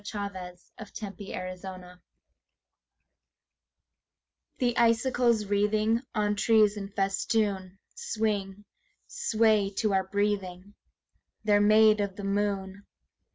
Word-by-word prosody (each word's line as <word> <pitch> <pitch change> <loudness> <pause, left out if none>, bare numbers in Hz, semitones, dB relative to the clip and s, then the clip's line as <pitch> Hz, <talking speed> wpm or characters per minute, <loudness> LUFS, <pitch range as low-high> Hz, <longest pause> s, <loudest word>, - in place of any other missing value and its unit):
SILVER 200 -3 -6 0.2
FILIGREE 185 -3 -8 2.6
The 245 -2 0
icicles 235 -1 +2
wreathing 210 +3 +1
On 210 -1 +1
trees 215 -1 +3
in 200 -1 -6
festoon 195 -1 -1 0.2
Swing, 210 - -3 0.4
swayed 215 - +1
to 215 -3 +1
our 190 -1 +1
breathing: 200 -1 -2 0.7
They're 205 -1 +3
made 215 0 +5
of 200 -2 -3
the 200 - -8
moon. 200 -1 -2
205 Hz, 85 wpm, -28 LUFS, 195-215 Hz, 2.6 s, made